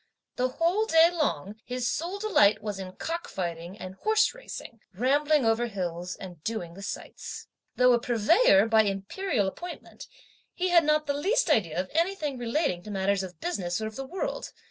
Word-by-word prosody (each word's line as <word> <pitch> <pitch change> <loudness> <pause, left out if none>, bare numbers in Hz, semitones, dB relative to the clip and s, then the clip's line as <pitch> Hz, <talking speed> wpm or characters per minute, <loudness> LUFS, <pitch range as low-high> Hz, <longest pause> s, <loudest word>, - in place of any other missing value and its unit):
The 255 - +1
whole 340 +11 +1
day 325 -1 +6
long, 215 - -2
his 250 -1 -3
sole 345 +9 -2
delight 215 - +3
was 205 -2 -4
in 185 -1 -7
cock 335 - -4
fighting 175 +1 -5
and 185 -1 -7
horse 435 - +2
racing, - - -9 0.2
rambling 285 +5 +2
over 225 +2 +2
hills 180 -4 -4
and 175 -5 -10
doing 200 -7 -3
the 195 - -11
sights. 200 - -7 0.3
Though 250 0 +5
a 240 - +3
Purveyor, 235 - +4
by 225 -1 +5
Imperial 205 - -1
appointment, 350 - -8 0.5
he 370 0 0
had 345 -1 +6
not 305 0 +2
the 285 - 0
least 385 +7 +1
idea 175 - +2
of 185 0 -3
anything 320 -5 -1
relating 240 - 0
to 210 - -11
matters 195 0 +1
of 185 -2 -8
business 185 - -2
or 220 - -3
of 215 0 -6
the 270 0 -5
world. 385 - -4
240 Hz, 180 wpm, -28 LUFS, -, 0.5 s, day